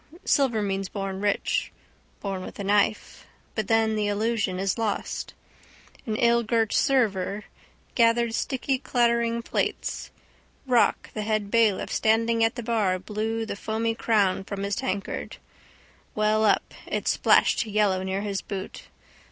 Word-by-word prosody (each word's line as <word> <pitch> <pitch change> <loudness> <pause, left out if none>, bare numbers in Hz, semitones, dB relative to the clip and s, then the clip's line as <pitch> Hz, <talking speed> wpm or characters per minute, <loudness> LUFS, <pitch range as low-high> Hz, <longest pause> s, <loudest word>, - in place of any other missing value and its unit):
Silver 245 -7 +2
means 195 -1 -2
born 195 -1 -4
rich. 205 -1 0 0.5
Born 195 -2 -3
with - - -9
a 200 - -4
knife. 205 +2 0 0.3
But 220 -3 -2
then 225 -1 +2
the 210 -1 0
allusion 205 -2 0
is 195 +3 -1
lost. 215 -3 -3 0.7
An 215 - -1
illgirt 235 -1 +2
server 210 -7 +1 0.5
gathered 230 -1 +3
sticky 265 +2 -1
clattering 235 -2 +1
plates. - - -2 0.6
Rock, 245 -3 +2
the 215 - -3
head 210 -1 -1
bailiff, 225 -4 +2
standing 230 +1 +2
at 225 +2 +2
the 240 - -5
bar 215 -5 +1
blew 220 +4 -3
the - - -4
foamy 220 +2 -1
crown 205 -5 +1
from 200 0 -5
his 200 0 -1
tankard. 195 +1 -4 0.8
Well 215 +1 +2
up: 210 - +2
it - - -3
splashed 230 - +3
yellow 205 -3 +2
near 190 +1 -2
his 200 -2 -2
boot. 190 -2 -7
215 Hz, 135 wpm, -26 LUFS, 200-230 Hz, 0.8 s, gathered